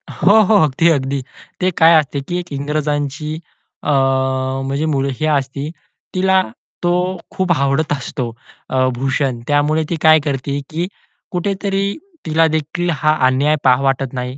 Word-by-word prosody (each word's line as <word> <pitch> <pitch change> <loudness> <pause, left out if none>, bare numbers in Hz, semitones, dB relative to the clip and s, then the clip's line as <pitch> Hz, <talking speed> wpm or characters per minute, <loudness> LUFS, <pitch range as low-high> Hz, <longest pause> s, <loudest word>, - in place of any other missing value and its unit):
हो, 205 +4 +4
हो. 210 +2 +3
अगदी, 155 +3 +2
अगदी. 140 -3 0 0.4
ते 185 +1 +2
काय 165 +1 +8
असते 145 -1 -3
की 175 - -2
एक 175 -2 -8
इंग्रजांची 150 +1 -2 0.4
अ, - - -2 0.8
म्हणजे 140 +3 -1
मुलगी 140 -1 -1
असते, 140 -1 -1 0.5
तिला 190 0 +3 0.4
तो 175 - +2 0.4
खूप 185 -1 -1
आवडत 145 0 +1
असतो 130 -2 -4 0.4
अ, 130 0 +2
भूषण 130 0 -1
त्यामुळे 150 +2 +2
ती 170 - 0
काय 155 0 +6
करते 140 0 -2
की 170 +3 -2 0.4
कुठेतरी 195 +2 -1 0.3
तिला 160 0 +3
देखील 160 +3 -2
हा 155 +1 +2
अन्याय 140 +4 +2
पाहू 130 +1 +4
वाटत 135 -1 0
नाही. 125 0 -4
150 Hz, 140 wpm, -18 LUFS, 135-165 Hz, 0.8 s, काय